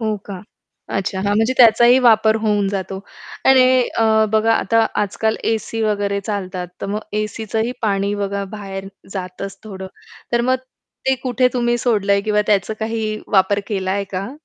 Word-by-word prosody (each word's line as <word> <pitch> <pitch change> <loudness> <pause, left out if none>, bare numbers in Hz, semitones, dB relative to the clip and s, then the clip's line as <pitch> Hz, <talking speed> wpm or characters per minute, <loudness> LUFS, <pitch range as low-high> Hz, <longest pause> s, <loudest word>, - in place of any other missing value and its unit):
हो 220 -1 -1
का? 195 -3 -7 0.6
अच्छा! 195 0 -2
हां. 205 +1 0
म्हणजे 225 +4 +2
त्याचाही 240 +1 +6
वापर 220 -1 +5
होऊन 205 -2 +1
जातो. 195 -1 -4 0.5
आणि 255 -1 +6 0.2
अ, 225 - +4 0.3
बघा 220 +1 +3
आता 225 0 +2 0.2
आजकाल 220 +2 -1 0.2
एसी 225 +1 -3
वगैरे 205 -2 0
चालतात, 185 -3 -4
तर - - -3
मग 205 +2 -2 0.2
एसीचं 215 0 -4
ही 240 - -2
पाणी 200 -1 0
बघा 200 -1 -2
बाहेर 195 -1 -7 0.2
जातच 195 +1 -6
थोडं. 190 -3 -7 0.5
तर 235 - +3
मग 260 - +4 0.5
ते 265 - +4
कुठे 250 0 +2
तुम्ही 240 -1 +1
सोडलंय 200 -4 +2
किंवा 210 0 +1
त्याचं 210 +1 +1
काही 220 -1 -2
वापर 200 +1 +3
केलाय 195 -1 -1
का? 195 +5 -3
210 Hz, 160 wpm, -19 LUFS, 195-225 Hz, 0.6 s, त्याचाही